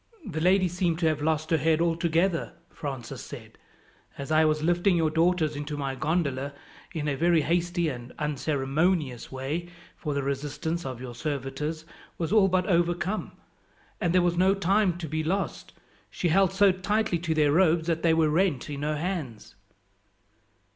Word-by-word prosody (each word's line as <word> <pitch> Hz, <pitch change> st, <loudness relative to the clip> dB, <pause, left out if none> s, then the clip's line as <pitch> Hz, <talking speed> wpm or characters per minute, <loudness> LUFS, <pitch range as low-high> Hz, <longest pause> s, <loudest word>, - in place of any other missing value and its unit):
"The 160 Hz, -6 st, -4 dB
lady 185 Hz, +2 st, +4 dB
seemed 175 Hz, -1 st, 0 dB
to 170 Hz, -, -1 dB
have 155 Hz, -2 st, +1 dB
lost 155 Hz, +1 st, 0 dB
her 160 Hz, -, +3 dB
head 160 Hz, +2 st, +2 dB
altogether," 170 Hz, +1 st, +1 dB, 0.2 s
Francis 135 Hz, -5 st, -6 dB
said. -, -, -11 dB, 0.6 s
"As 140 Hz, +2 st, -6 dB
I 155 Hz, 0 st, +5 dB
was 155 Hz, 0 st, +1 dB
lifting 175 Hz, +2 st, +3 dB
your 160 Hz, -2 st, +2 dB
daughters 165 Hz, -1 st, +2 dB
into 145 Hz, +1 st, -4 dB
my 135 Hz, -2 st, -2 dB
gondola, 140 Hz, -2 st, -1 dB, 0.4 s
in 150 Hz, -2 st, -3 dB
a 145 Hz, -, +1 dB
very 165 Hz, +1 st, +3 dB
hasty 175 Hz, +1 st, 0 dB
and 125 Hz, -4 st, -5 dB
unceremonious 145 Hz, 0 st, -1 dB
way 145 Hz, +7 st, -4 dB, 0.3 s
for 150 Hz, -3 st, -4 dB
the 140 Hz, -, -1 dB
resistance 145 Hz, +4 st, -3 dB
of 130 Hz, -3 st, -6 dB
your 125 Hz, -2 st, -7 dB
servitors 145 Hz, +4 st, -4 dB, 0.3 s
was 165 Hz, 0 st, -2 dB
all 210 Hz, -3 st, +6 dB
but 185 Hz, -1 st, +1 dB
overcome, 175 Hz, +3 st, 0 dB, 0.7 s
and 175 Hz, -5 st, +1 dB
there 180 Hz, 0 st, +4 dB
was 175 Hz, -1 st, +1 dB
no 190 Hz, +2 st, +4 dB
time 195 Hz, -1 st, +2 dB
to 170 Hz, -2 st, -5 dB
be 155 Hz, +1 st, -2 dB
lost 190 Hz, +5 st, -2 dB, 0.4 s
she 175 Hz, -, -1 dB
held 190 Hz, +2 st, +4 dB
so 195 Hz, 0 st, +5 dB
tightly 190 Hz, 0 st, 0 dB
to 160 Hz, -1 st, -1 dB
their 150 Hz, -2 st, +3 dB
robes 165 Hz, 0 st, +3 dB
that 165 Hz, -1 st, 0 dB
they 165 Hz, -1 st, +3 dB
were 160 Hz, -1 st, +3 dB
rent 160 Hz, -5 st, +1 dB
in 140 Hz, -1 st, -5 dB
her 150 Hz, +1 st, -1 dB
hands." 155 Hz, -, -4 dB
160 Hz, 170 wpm, -27 LUFS, 145-175 Hz, 0.7 s, all